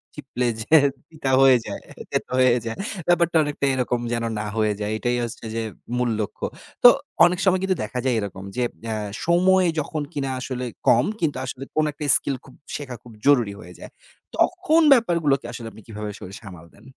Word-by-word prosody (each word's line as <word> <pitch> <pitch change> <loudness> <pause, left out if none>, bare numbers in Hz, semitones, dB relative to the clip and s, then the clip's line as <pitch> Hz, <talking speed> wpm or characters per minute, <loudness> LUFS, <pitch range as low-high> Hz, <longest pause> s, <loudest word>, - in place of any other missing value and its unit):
চিপলে 130 -4 -3
যে 135 +8 +3 0.3
তিতা 150 -5 -3
হয়ে 130 -2 +7
যায়, - - -6 0.3
তেতো - - -2
হয়ে 125 -1 +5
যায়।" 115 - -4 0.3
ব্যাপারটা 170 -1 +3
অনেকটা 145 -1 -2
এরকম 125 -1 0
যেন 115 0 -1 0.2
না 105 - -3
হয়ে 105 -1 +2
যায়, 105 0 -2
এটাই 120 +2 0
হচ্ছে 115 0 -6
যে 115 - -1 0.4
মূল 125 -1 +1
লক্ষ্য। 100 - -4 0.4
তো 245 - +12 0.4
অনেক 175 0 +1
সময় 185 0 +4
কিন্তু 190 -1 +1
দেখা 125 +4 -4
যায় 130 - +2
এরকম 95 -2 -6
যে, 125 - 0 0.2
অ্যা 110 -1 -2 0.3
সময় 185 +2 +4
যখন 150 +1 -3
কিনা 135 -2 -2
আসলে 130 -1 -4 0.2
কম, 120 +3 +5
কিন্তু 155 -7 0
আসলে 130 +1 -6
কোন 155 - +3
একটা 150 - -8
স্কিল 140 - -3
খুব 130 - -15 0.2
শেখা 135 -4 -6
খুব 120 - -13
জরুরি 125 -8 +4
হয়ে - - -11
যায়। - - -10 0.5
তখন 360 -3 +3
ব্যাপারগুলোকে 170 - +2
আসলে 115 -2 -7
আপনি 110 - -14
কীভাবে 105 -1 -6
আসলে 95 -2 -10
সামাল 90 -6 -11
দেন? - - -20
130 Hz, 185 wpm, -23 LUFS, 115-160 Hz, 0.5 s, তো